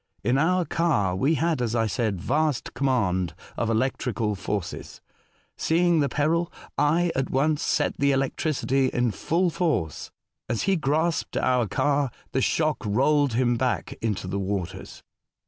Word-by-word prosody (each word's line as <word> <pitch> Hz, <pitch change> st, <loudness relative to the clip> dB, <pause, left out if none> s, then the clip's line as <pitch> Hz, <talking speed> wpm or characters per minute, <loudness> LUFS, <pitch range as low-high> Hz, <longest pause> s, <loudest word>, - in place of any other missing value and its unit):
In 125 Hz, +5 st, +2 dB
our 180 Hz, +3 st, +2 dB
car 110 Hz, -, +1 dB
we 140 Hz, +12 st, +2 dB
had, 160 Hz, -4 st, 0 dB
as 120 Hz, -1 st, -1 dB
I 115 Hz, -1 st, +2 dB
said, 110 Hz, -3 st, -1 dB
vast 145 Hz, -, 0 dB
command 105 Hz, -, 0 dB, 0.2 s
of 115 Hz, -, -1 dB
electrical 115 Hz, -2 st, 0 dB
forces. 100 Hz, -1 st, -5 dB, 0.6 s
Seeing 170 Hz, 0 st, +2 dB
the 140 Hz, -2 st, +2 dB
peril, 165 Hz, +5 st, 0 dB, 0.2 s
I 165 Hz, +4 st, +2 dB
at 135 Hz, 0 st, -1 dB
once 150 Hz, +3 st, +1 dB
set -, -, 0 dB
the 140 Hz, 0 st, +3 dB
electricity 135 Hz, 0 st, 0 dB
in 120 Hz, -2 st, 0 dB
full 170 Hz, -, 0 dB
force. 120 Hz, -, -1 dB, 0.4 s
As 115 Hz, -, -1 dB
he 195 Hz, -, +2 dB
grasped 160 Hz, +1 st, 0 dB
our 125 Hz, -3 st, +2 dB
car, 145 Hz, +5 st, +1 dB, 0.2 s
the 130 Hz, -, 0 dB
shock 155 Hz, +2 st, +1 dB
rolled 140 Hz, +6 st, +2 dB
him 120 Hz, 0 st, +2 dB
back 125 Hz, +1 st, -1 dB
into 105 Hz, -5 st, -2 dB
the 95 Hz, +2 st, -3 dB
waters. 95 Hz, -1 st, -4 dB
135 Hz, 145 wpm, -25 LUFS, 110-155 Hz, 0.6 s, the